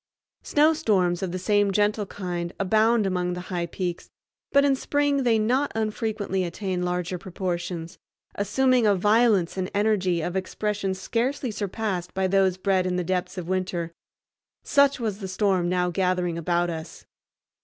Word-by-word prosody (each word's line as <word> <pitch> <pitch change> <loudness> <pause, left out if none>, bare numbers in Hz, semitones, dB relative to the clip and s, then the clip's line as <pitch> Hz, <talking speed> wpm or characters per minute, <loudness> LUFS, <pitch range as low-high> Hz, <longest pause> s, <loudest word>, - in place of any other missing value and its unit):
Snowstorms 215 - +2
of 190 -2 -2
the 185 - -3
same 205 +2 +2
gentle 205 +1 +1
kind 175 -3 -4
abound 215 +3 +3
among 180 -1 -1
the 180 - -5
high 170 -1 -1
peaks, 175 0 -4 0.4
but 280 0 +5
in 275 -1 +3
spring 285 +1 +1
they 235 -3 +3
not 255 +6 +1
unfrequently 215 -3 -1
attain 180 +1 -3
larger 180 0 -2
proportions, 175 -2 -4 0.3
assuming 250 +3 +2
a 205 - +4
violence 210 -2 +3
and 185 0 -2
energy 200 -4 +2
of 175 +3 -3
expression 195 +1 -2
scarcely 245 +6 -2
surpassed 200 -3 -3
by 190 0 +1
those 190 -1 +2
bred 190 -1 +1
in 180 - -1
the 180 - 0
depths 180 +2 -2
of 175 -2 -5
winter. 180 -2 -2 0.7
Such 280 -1 +3
was 215 -4 -2
the 195 - -5
storm 185 -2 +1
now 180 0 +1
gathering 180 -1 0
about 175 +1 0
us. 160 -1 -8
190 Hz, 155 wpm, -25 LUFS, 180-215 Hz, 0.7 s, but